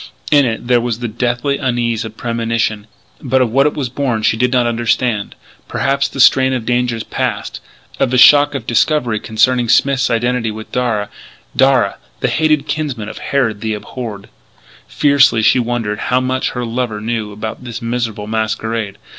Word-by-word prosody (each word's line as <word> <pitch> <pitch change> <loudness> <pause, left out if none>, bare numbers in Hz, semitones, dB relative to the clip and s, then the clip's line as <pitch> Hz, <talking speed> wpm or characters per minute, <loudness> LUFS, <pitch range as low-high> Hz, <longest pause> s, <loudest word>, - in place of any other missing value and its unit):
In 145 -2 +5
it 115 -1 -3
there 120 -1 +3
was 120 -2 -2
the 120 0 -4
deathly 125 +5 -1
unease 120 -4 -1
of 110 -1 -9
premonition. 115 -2 -2 0.3
But 130 -1 +1
of 115 - -2
what 135 +4 +4
it 150 - -2
was 140 -4 -2
born 120 -3 -2
she 110 - +3
did 125 +2 +1
not 125 -2 +2
understand, 115 -2 -1 0.3
perhaps 140 0 0
of - - -16
the - - -6
strain 130 0 +5
of 125 -3 -3
dangers 120 -2 0
passed - - -3 0.4
of - - +2
the 130 - +1
shock 145 +2 +6
of 125 -5 -4
discovery 120 -2 +1
concerning 120 +2 +1
Smith's 135 +1 +3
identity 120 0 0
with 110 0 -8
Darragh 115 -5 -1 0.5
Darragh! 130 -7 +3 0.2
the - - 0
hated 155 -2 +1
kinsman 140 -9 -3
of - - -9
Harrod 115 -7 -1
the 110 -1 -2
abhorred. 105 -2 -7 0.6
Fiercely 140 -6 +3
she 125 - +4
wondered 115 -3 -2
how 125 - +3
much 130 0 -1
her 125 -1 -3
lover 115 -2 -3
knew 110 -1 -3
about 110 +4 -6
this 120 -2 -6
miserable 115 -3 -3
masquerade. 110 -1 -2
120 Hz, 175 wpm, -16 LUFS, 110-130 Hz, 0.6 s, shock